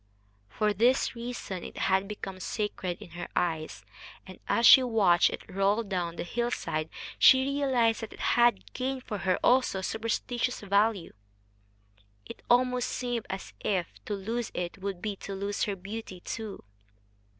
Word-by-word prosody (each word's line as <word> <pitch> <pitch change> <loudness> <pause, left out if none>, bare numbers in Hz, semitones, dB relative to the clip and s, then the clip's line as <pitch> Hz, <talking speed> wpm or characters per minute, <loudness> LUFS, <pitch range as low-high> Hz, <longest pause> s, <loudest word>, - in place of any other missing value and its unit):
For 210 - 0
this 240 +6 +3
reason 235 -6 -6
it - - -9
had 190 +1 +1
become 195 -2 -7
sacred 185 -3 -3
in 170 - -14
her 175 +1 -6
eyes, 160 -3 -2 0.4
and, 185 -1 -12
as 235 - +2
she 265 - +10
watched 210 -8 +4
it - - -6
roll 195 +4 +1
down 180 -5 -3
the - - -4
hillside, 175 -7 -2 0.3
she 260 0 +7
realized 265 -5 +1
that 225 - -7
it - - -14
had 240 0 +2
gained 260 0 -3
for 210 -5 -5
her 185 -1 +1
also 250 -5 +3
a 190 - -4
superstitious 230 +4 -2
value. 200 -2 +1 1.1
It - - -10
almost 250 0 +3
seemed 245 -2 -3
as 190 0 -6
if 185 -4 -1 0.2
to 210 - -2
lose 225 +4 -3
it 175 +2 -4
would 190 -2 -5
be 210 -2 -2
to 195 - -6
lose 200 +1 -1
her 205 - -2
beauty 195 0 -7
too. 215 +2 -6
210 Hz, 160 wpm, -29 LUFS, 190-240 Hz, 1.1 s, she